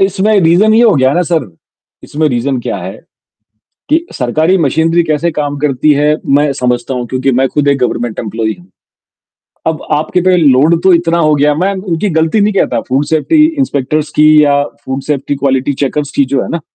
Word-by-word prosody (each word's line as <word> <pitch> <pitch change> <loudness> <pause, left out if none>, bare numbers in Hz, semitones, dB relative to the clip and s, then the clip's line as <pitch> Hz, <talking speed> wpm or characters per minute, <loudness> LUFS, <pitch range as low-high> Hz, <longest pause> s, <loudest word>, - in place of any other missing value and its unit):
इसमें 200 +2 +1
रीज़न 185 +6 +3
ये 235 - +4
हो 220 -6 +4
गया 130 0 +2
ना 180 - +1
सर, 160 - -1 0.5
इसमें 155 +1 -2
रीज़न 125 +1 -2
क्या 100 - -4
है 95 +2 -8 0.9
कि 325 +3 +1
सरकारी 155 +9 0
मशीनरी 165 +2 +1
कैसे 155 +2 -1
काम 145 -1 -3
करती 150 +1 +1
है 150 +1 +1 0.2
मैं 145 0 +2
समझता 125 -1 -2
हूँ, 125 -1 -3
क्योंकि 130 +2 -1
मैं 130 +2 +1
खुद 145 -1 -1
एक 140 -1 +2
गवर्नमेंट 120 -2 -2
एम्प्लॉयी 110 0 -3
हूँ। 90 - -19 1.0
अब 160 -1 -2
आपके 160 +4 0
पे 185 -1 +3
लोड 155 +2 +3
तो 190 - +4
इतना 170 0 0
हो 155 -2 +2
गया। 145 +1 +2
मैं 185 +6 -1
उनकी 185 0 -3
गलती 160 +6 +1
नहीं 205 +1 +2
कहता - - 0
फूड 135 +3 0
सेफ्टी 240 - +2
इंस्पेक्टर्स 150 - -1
की 150 - +5 0.2
या 145 0 +2 0.2
फूड 135 +1 -4
सेफ्टी 145 -1 -2
क्वालिटी 135 0 0
चेकर्स 145 +1 -2
की 140 - +3
जो 130 0 -1
है - - -6
ना, 170 - -3
150 Hz, 195 wpm, -12 LUFS, 135-170 Hz, 1.0 s, की